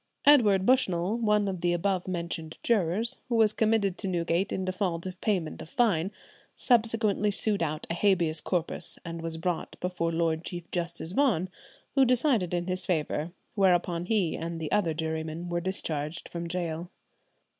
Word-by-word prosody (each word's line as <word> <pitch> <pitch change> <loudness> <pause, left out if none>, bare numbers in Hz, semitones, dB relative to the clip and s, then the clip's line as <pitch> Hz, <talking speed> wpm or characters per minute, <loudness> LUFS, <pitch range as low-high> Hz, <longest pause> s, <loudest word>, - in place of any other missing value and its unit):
Edward 210 -10 +6
Bushell, 200 -6 +2
one 210 -2 +2
of 185 -3 -3
the 175 0 +2
above 185 +1 0
mentioned 170 -3 -4
jurors, 215 +1 +1
who 240 - +1
was 220 -2 +4
committed 215 -4 +1
to 200 - -3
Newgate 175 +1 0
in 190 - -2
default 185 -2 -2
of 185 -1 -7
payment 185 -7 -1
of 160 - -10
fine, 200 - +2 0.4
subsequently 225 -3 +2
sued 205 0 +1
out 155 -2 -2
a - - -2
Habeas 170 -4 +2
Corpus, 175 -1 -1
and 165 0 -5
was 165 0 -3
brought 170 +1 -3
before 180 -2 -1
Lord 165 -1 0
Chief 175 -1 -5
Justice 170 -1 -3
Vaughan, 195 - +2 0.4
who 270 - +5
decided 245 - +2
in 175 -1 -1
his 185 0 -2
favour, 160 -1 -1 0.2
whereon 175 -3 +2
he 200 -7 +1
and 165 0 -4
the 155 -2 -4
other 170 -6 +1
jurymen 160 +1 -3
were 175 0 -1
discharged 165 -4 -3
from 170 0 -5
gaol. 170 -1 -3
180 Hz, 165 wpm, -28 LUFS, 165-205 Hz, 0.4 s, Edward